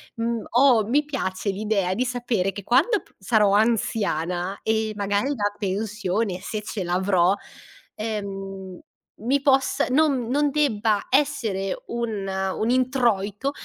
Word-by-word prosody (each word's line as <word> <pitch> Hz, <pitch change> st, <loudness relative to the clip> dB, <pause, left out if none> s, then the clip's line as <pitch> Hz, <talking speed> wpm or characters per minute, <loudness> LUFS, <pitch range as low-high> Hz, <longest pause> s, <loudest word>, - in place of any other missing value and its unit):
mhmm, 230 Hz, -1 st, -2 dB
ho 245 Hz, -3 st, +5 dB
mi 285 Hz, +6 st, +2 dB
piace 205 Hz, -9 st, -3 dB
l'idea 200 Hz, -2 st, 0 dB
di 250 Hz, +6 st, 0 dB
sapere 240 Hz, -6 st, -1 dB
che 200 Hz, 0 st, -7 dB
quando 310 Hz, -, +3 dB
p -, -, -26 dB
sarò 210 Hz, 0 st, +3 dB
anziana 200 Hz, -4 st, 0 dB
e 220 Hz, 0 st, 0 dB
magari 205 Hz, +4 st, 0 dB
la 205 Hz, -3 st, -1 dB
pensione, 200 Hz, -1 st, -2 dB
se 210 Hz, +3 st, -4 dB
ce 210 Hz, -2 st, -4 dB
l'avrò, 180 Hz, 0 st, +2 dB, 0.6 s
ehm, 195 Hz, -3 st, -5 dB, 0.4 s
mi 270 Hz, +5 st, +1 dB
possa 270 Hz, -1 st, +2 dB
non 270 Hz, -3 st, +2 dB
non 290 Hz, +3 st, +2 dB
debba 225 Hz, -8 st, +1 dB
essere 220 Hz, -9 st, 0 dB
un 225 Hz, -4 st, -3 dB, 0.3 s
un 220 Hz, -, -1 dB
introito 245 Hz, -2 st, +1 dB
215 Hz, 130 wpm, -24 LUFS, 195-245 Hz, 0.6 s, ho